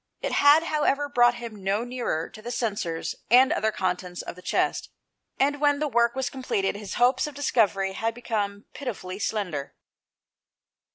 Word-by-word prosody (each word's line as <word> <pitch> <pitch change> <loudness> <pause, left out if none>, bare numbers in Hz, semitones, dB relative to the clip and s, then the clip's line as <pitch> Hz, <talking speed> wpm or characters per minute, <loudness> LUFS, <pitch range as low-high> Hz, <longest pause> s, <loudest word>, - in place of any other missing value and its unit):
It - - -3
had, 290 +3 +6
however, 295 -3 +1
brought 240 -3 +4
him 225 -5 -8
no 200 +4 0
nearer 240 -10 -2
to 215 - -13
the 235 - -6
censers 205 -9 -2 0.2
and 255 +3 +6
other 220 - +1
contents 180 -2 -3
of - - -7
the 180 - -13
chest, - - 0 0.5
and 285 +2 +1
when 290 -1 +4
the 300 +1 -1
work 235 -2 +2
was 265 -1 -1
completed, 210 -8 -1
his 205 -2 -6
hopes 250 +3 +3
of 295 - -9
discovery 205 -8 +1
had 225 +3 -2
become 205 -4 -3
pitifully 200 -8 -6
slender. 180 -10 -3
230 Hz, 165 wpm, -26 LUFS, 195-260 Hz, 0.5 s, had